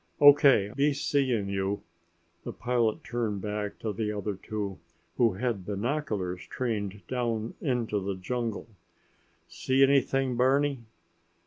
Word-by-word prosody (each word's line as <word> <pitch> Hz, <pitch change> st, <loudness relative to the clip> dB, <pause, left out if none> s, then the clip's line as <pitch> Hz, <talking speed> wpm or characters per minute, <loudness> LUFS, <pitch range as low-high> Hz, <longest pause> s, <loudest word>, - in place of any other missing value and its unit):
O.K. 140 Hz, -8 st, +7 dB
Be 145 Hz, +2 st, +3 dB
seeing 130 Hz, -7 st, 0 dB
you!" 100 Hz, +1 st, -2 dB, 0.6 s
The -, -, -5 dB
pilot 120 Hz, -3 st, 0 dB
turned 115 Hz, -5 st, -2 dB
back 105 Hz, -1 st, -3 dB
to 110 Hz, -2 st, -2 dB
the 105 Hz, +1 st, -2 dB
other 105 Hz, 0 st, -3 dB
two, 100 Hz, 0 st, -5 dB, 0.4 s
who 115 Hz, -5 st, +4 dB
had 110 Hz, -1 st, -2 dB
binoculars 105 Hz, -, -2 dB
trained 105 Hz, -5 st, -3 dB
down 115 Hz, -3 st, -2 dB
into 120 Hz, -6 st, 0 dB
the 100 Hz, 0 st, -2 dB
jungle. 115 Hz, +4 st, -3 dB, 0.8 s
"See 130 Hz, +1 st, +2 dB
anything, 135 Hz, -1 st, +3 dB
Barney?" 135 Hz, +2 st, +2 dB
115 Hz, 120 wpm, -28 LUFS, 100-130 Hz, 0.8 s, O.K